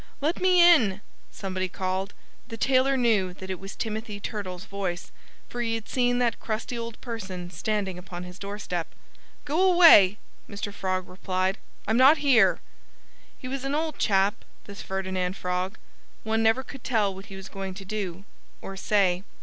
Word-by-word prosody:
"Let 310 +5 -1
me 365 -1 +4
in!" 225 - +5 0.3
somebody 185 -1 -4
called. 190 +2 -3 0.3
The 230 -2 -7
tailor 265 +3 +3
knew 210 -7 +2
that 190 0 -7
it 185 - -4
was 195 0 -8
Timothy 220 -1 -4
Turtle's 190 -4 -5
voice, 190 -3 -4 0.4
for 240 - -5
he 230 -1 0
had 225 -1 -6
seen 245 -1 +1
that 240 -2 +1
crusty 225 +2 -4
old 230 -1 -6
person 190 -7 -6
standing 195 -3 -2
upon 180 -1 -8
his 180 +2 -10
doorstep. 200 -4 -5 0.5
"Go 300 +5 +1
away!" 215 - +8 0.3
Mr. 205 0 -5
Frog 185 -2 -2
replied. 185 +1 -2 0.3
"I'm 220 +2 +2
not 270 +5 +7
here." 250 -10 +4 0.8
He 255 - -8
was 265 0 -4
an 275 +1 -1
odd 315 -1 -2
chap 200 +1 +2 0.2
this 200 -1 -10
Ferdinand 190 -1 -3
Frog. 180 +1 -2 0.5
One 225 0 0
never 225 +4 +3
could 270 0 -11
tell 215 -6 +1
what 195 +1 -11
he 195 - -9
was 190 0 -9
going 195 -1 -6
to 195 0 -9
do 190 -3 -4 0.4
or 195 - -8
say. 190 -2 +1
200 Hz, 165 wpm, -26 LUFS, 190-235 Hz, 0.8 s, away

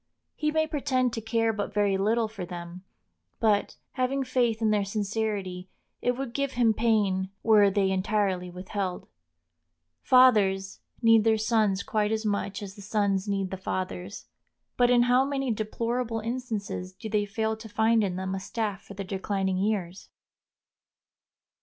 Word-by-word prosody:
He 305 - 0
may 315 +1 +2
pretend 260 -5 0
to 225 - -3
care 225 0 +1
but 205 -1 -4
very 205 -2 +2
little 220 +4 +1
for 215 -3 -7
them; 175 0 -8 0.6
but, 210 -2 +2 0.2
having 270 +1 0
faith 245 -3 +1
in 220 -2 +2
their 210 -1 +2
sincerity, 200 -3 -3 0.3
it 245 0 0
would 265 -3 -4
give 280 0 -1
him 235 -3 +3
pain 205 -4 +1
were 210 -3 +6
they 195 -1 +1
entirely 190 -1 0
withheld. 185 +1 -4 0.9
Fathers 200 -7 +4 0.2
need 225 -1 +6
their 220 0 +3
sons 215 -3 +1
quite 210 -1 0
as 220 0 -1
much 205 -1 -2
as 195 -1 -7
the 205 - -12
sons 200 -1 0
need 195 -2 -1
the 190 - -4
fathers; 185 +1 -4 0.5
but 245 -1 +4
in 245 -1 +5
how 250 +2 +4
many 270 -2 -1
deplorable 230 +2 -2
instances 220 -5 -4
do 220 +4 -8
they 210 -1 0
fail 220 +2 -1
to 220 0 -11
find 220 +1 +3
in 185 -3 -1
them 190 +1 -3
a 195 - -2
staff 205 0 -3
for 200 - -12
their 195 0 -5
declining 190 0 -1
years! 195 -3 -2
210 Hz, 160 wpm, -27 LUFS, 195-230 Hz, 0.9 s, were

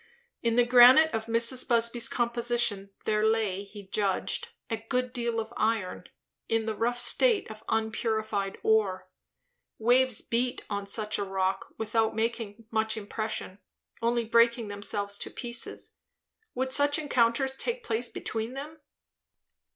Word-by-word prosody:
In 230 -1 +1
the 245 0 +4
granite 250 +6 +7
of 225 0 -3
Mrs. 235 +2 +3
Busby's 235 -1 +3
composition 235 -4 0 0.2
there 215 0 +1
lay, 215 -3 +1
he 200 0 -12
judged, 205 - -1 0.2
a 225 - -2
good 250 +3 -2
deal 235 -2 -1
of 225 +1 -6
iron, 215 -4 -1 0.4
in 225 -1 +1
the 220 - -2
rough 240 +3 -1
state 470 - +3
of 215 0 -12
unpurified 220 -2 -1
ore. 210 -4 +1 0.7
Waves 245 +1 +3
beat 245 +1 -2
on 200 -1 -3
such 210 +1 -1
rock 190 -1 -2
without 220 0 0
making 225 -1 -3
much 220 0 0
impression, 215 -2 -5 0.4
only 235 0 +1
breaking 235 0 +3
themselves 205 0 -2
to - - -4
pieces. 240 -1 -3 0.6
Would 260 +1 -1
such 285 +1 +3
encounters 265 -2 +1
take 475 - -3
place 230 +2 -1
between 225 +2 -4
them? 300 +4 -8
225 Hz, 135 wpm, -28 LUFS, 215-245 Hz, 0.7 s, granite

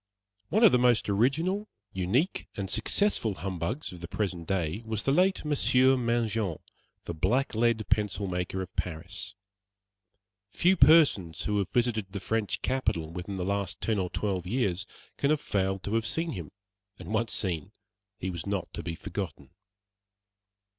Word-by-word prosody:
One 215 +4 +3
of 220 - +9
the 125 - +4
most 120 -4 +3
original, 160 - +1 0.3
unique, 105 - 0
and 95 -1 -3
successful 115 - +1
humbugs 95 - -3
of 90 -2 -10
the 85 - -5
present 90 -5 -3
day 95 +1 -1
was 110 -1 -2
the 135 - +2
late 185 +3 +3
Monsieur 130 -3 +4
Mangin, 115 -7 0 0.5
the 85 - -4
blacklead 110 - +1
pencil 105 -1 +1
maker 90 +1 -2
of 90 - -12
Paris. 90 +4 -4 1.1
Few 180 - +3
persons 135 - +5
who 105 -1 0
have 100 - -1
visited 110 -5 0
the 100 - -3
French 105 -2 -1
capital 85 -12 0
within 90 +3 -5
the 90 -1 -2
last 100 -2 -1
ten 110 -2 0
or 90 -1 -1
twelve 95 -3 -2
years 100 -5 0 0.3
can 140 - +1
have 155 -1 +3
failed 95 -4 -1
to 100 - -3
have 115 -1 +1
seen 165 0 -1
him, 85 - -6 0.5
and - - -7
once 115 +1 +1
seen 95 0 -1 0.5
he 95 - -3
was 85 0 -6
not 100 -3 -2
to - - -4
be 85 -1 -4
forgotten. 80 -8 -6
105 Hz, 160 wpm, -29 LUFS, 90-125 Hz, 1.1 s, of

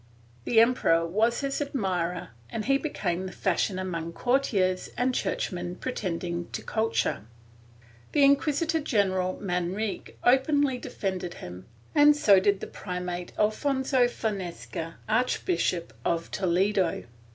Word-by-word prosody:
The 230 - +4
emperor 225 -8 +4
was 220 +9 +1
his 275 +1 -2
admirer 185 -11 -2 0.2
and 215 - -4
he 275 +1 +3
became 190 - -2
the - - -7
fashion 190 +1 0
among 170 -3 -4
courtiers 200 -7 +1
and 255 +1 +1
churchmen 175 -6 -2
pretending 175 -7 -3
to - - -4
culture. 220 - -1 0.9
The 290 - +3
Inquisitor 300 +3 +3
general 190 -9 0
Manrique 190 +3 -3
openly 265 +1 +3
defended 185 -6 -4
him, 90 +1 -9 0.3
and 295 0 +6
so 205 -10 +6
did 200 0 +2
the - - -3
primate, 180 -1 -5
Alfonso 260 +3 +2
Fonseca, 180 -7 -4
Archbishop 220 - 0
of 170 0 -1
Toledo. 190 0 +1
200 Hz, 120 wpm, -27 LUFS, 180-255 Hz, 0.9 s, and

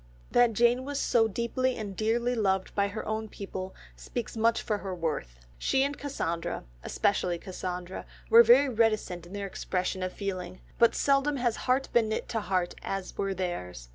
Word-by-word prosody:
That 245 -1 +4
Jane 240 +3 +3
was 285 +1 -3
so 230 -3 +3
deeply 240 +4 -1
and 205 -4 -5
dearly 235 +4 +1
loved 190 -5 0
by 200 -1 +2
her 205 +2 -6
own 220 0 -2
people 190 -2 -6 0.2
speaks 240 -2 -5
much 230 +1 +2
for 210 -2 -1
her 190 -2 -4
worth. 150 - -3 0.2
She 265 - +2
and 285 +1 -1
Cassandra, 170 - -3 0.2
especially 180 - 0
Cassandra, 180 0 -6 0.2
were 230 - +9
very 245 +5 +6
reticent 215 -7 0
in 180 - -12
their 200 0 -3
expression 185 -1 -2
of 185 0 -2
feeling, 185 -2 -5 0.2
but 235 -1 +5
seldom 280 +1 +2
has 240 -3 +1
heart 260 +1 +1
been 225 -2 +3
knit 220 - -2
to 225 - -1
heart 185 -3 -1
as 195 -1 -4
were 195 -1 -1
theirs. 90 - -4
210 Hz, 175 wpm, -29 LUFS, 185-235 Hz, 0.2 s, were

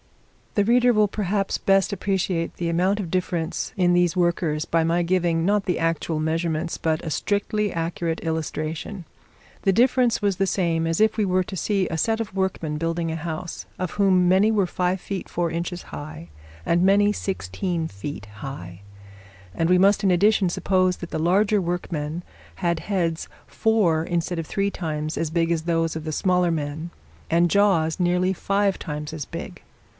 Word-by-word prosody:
The 205 - +3
reader 245 +2 +4
will 215 -2 +3
perhaps 200 -1 -1
best 195 0 +2
appreciate 190 -4 -1
the 170 - -3
amount 185 +5 +1
of 180 -5 -4
difference 175 -2 -2
in 175 -1 +3
these 175 0 +2
workers 170 -3 +1
by 165 -1 +1
my 170 +2 +2
giving, 170 -2 +1
not 205 +1 +2
the 180 -3 0
actual 165 -1 -1
measurements, 160 +1 -1
but 160 0 -1
a - - -2
strictly 205 +5 0
accurate 165 0 -2
illustration: 160 +3 -4 0.6
the 195 - +3
difference 245 +2 +3
was 200 -3 +1
the 195 0 +1
same 165 -3 0
as 165 0 0
if 220 0 +4
we 220 - +1
were 185 -1 +2
to 190 - -7
see 195 0 0
a 160 - -3
set 225 +6 +1
of 225 -4 -4
workmen 185 -5 -1
building 165 +1 -1
a - - -2
house, 165 +1 -5
of 185 -2 -3
whom 190 -3 +3
many 190 +4 +4
were 205 -3 +2
five 180 +1 -1
feet 195 +1 -5
four 170 -1 -1
inches 175 +1 -4
high, 145 - -9 0.4
and 170 +1 +2
many 200 +2 +4
sixteen 175 - -3
feet 105 +1 -7
high; 90 -10 -8 0.7
but 165 +1 +1
we 180 - +5
must 195 +2 +4
in 195 - +4
addition 200 +1 +3
suppose 185 0 +1
that 175 - -8
the - - -2
larger 200 +5 +3
workmen 170 -2 -3 0.3
had 170 -1 0
heads 170 -5 -1 0.2
four 200 -8 +2
instead 175 0 -2
of 160 - -4
three 200 0 0
times 155 -3 -3
as 165 - -1
big 165 +1 +1
as 165 -2 +1
those 165 -1 0
of 160 - -4
the 155 - -2
smaller 180 +2 +2
men, 155 +1 -3 0.4
and 170 0 +3
jaws 195 -5 +3
nearly 180 +1 +2
five 200 +1 0
times 150 0 -5
as 155 -4 -5
big. - - -8
175 Hz, 180 wpm, -24 LUFS, 165-195 Hz, 0.7 s, we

